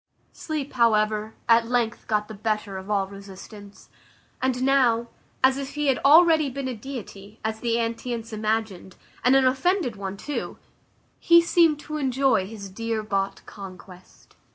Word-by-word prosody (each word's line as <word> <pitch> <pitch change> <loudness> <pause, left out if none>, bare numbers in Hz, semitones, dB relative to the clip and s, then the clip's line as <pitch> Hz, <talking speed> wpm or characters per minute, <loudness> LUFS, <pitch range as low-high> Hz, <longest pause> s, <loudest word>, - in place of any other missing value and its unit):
Sleep, 300 -3 -5
however, 215 -2 +1
at 230 0 +4
length 240 -1 -1
got 210 -2 0
the 220 - -8
better 210 -1 -3
of 190 +2 -11
all 200 -2 +1
resistance; 200 +1 -12 0.5
and 255 -1 0
now, 245 -4 +3 0.3
as 260 0 +5
if 275 +1 -6
he 295 -1 0
had 265 - +2
already 315 0 +6
been 270 0 -5
a 255 - -3
deity, 220 -4 -9
as 220 0 -2
the 230 0 0
antients 230 0 -3
imagined, 215 -4 -2 0.3
and 250 +3 +5
an 270 -1 +4
offended 265 - +1
one 195 -1 -6
too, 290 +7 -5 0.6
he 340 0 +6
seemed 335 -3 +3
to 305 0 -5
enjoy 265 -7 +1
his 205 -2 -8
dear 225 +3 -3
bought 195 -2 -2
conquest. 185 -2 -13
230 Hz, 155 wpm, -24 LUFS, 210-265 Hz, 0.6 s, already